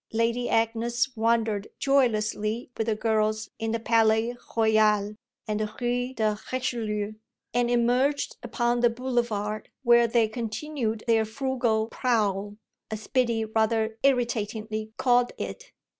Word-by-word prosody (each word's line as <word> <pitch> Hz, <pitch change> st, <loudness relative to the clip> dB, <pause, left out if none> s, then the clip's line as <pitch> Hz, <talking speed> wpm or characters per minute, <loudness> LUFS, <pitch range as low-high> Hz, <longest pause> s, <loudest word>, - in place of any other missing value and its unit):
Lady 230 Hz, +2 st, 0 dB
Agnes 230 Hz, +3 st, 0 dB
wandered 225 Hz, -2 st, +1 dB
joylessly 230 Hz, -4 st, +1 dB
with 225 Hz, -, -2 dB
the 220 Hz, -, +1 dB
girls 215 Hz, 0 st, 0 dB
in 225 Hz, 0 st, -2 dB
the 230 Hz, -, -1 dB
Palais 225 Hz, +1 st, +2 dB, 0.2 s
Royal 215 Hz, -2 st, +3 dB, 0.3 s
and 210 Hz, 0 st, -1 dB
the 215 Hz, -1 st, -2 dB
Rue 245 Hz, +1 st, -1 dB
de 215 Hz, -2 st, 0 dB
Richelieu, 220 Hz, -5 st, -2 dB, 0.4 s
and 240 Hz, 0 st, +2 dB
emerged 245 Hz, +4 st, +1 dB
upon 240 Hz, -1 st, 0 dB
the 240 Hz, 0 st, +4 dB
Boulevard, 230 Hz, -4 st, -2 dB
where 235 Hz, -1 st, +6 dB
they 230 Hz, -1 st, +3 dB
continued 225 Hz, +1 st, -3 dB
their 225 Hz, -2 st, +3 dB
frugal 230 Hz, -1 st, 0 dB
prowl, 205 Hz, -4 st, 0 dB, 0.3 s
as 215 Hz, 0 st, -6 dB
Biddy 235 Hz, -4 st, +1 dB
rather 220 Hz, 0 st, 0 dB
irritatingly 220 Hz, -4 st, 0 dB
called 245 Hz, -1 st, +3 dB
it. -, -, -6 dB
225 Hz, 125 wpm, -26 LUFS, 215-245 Hz, 0.4 s, where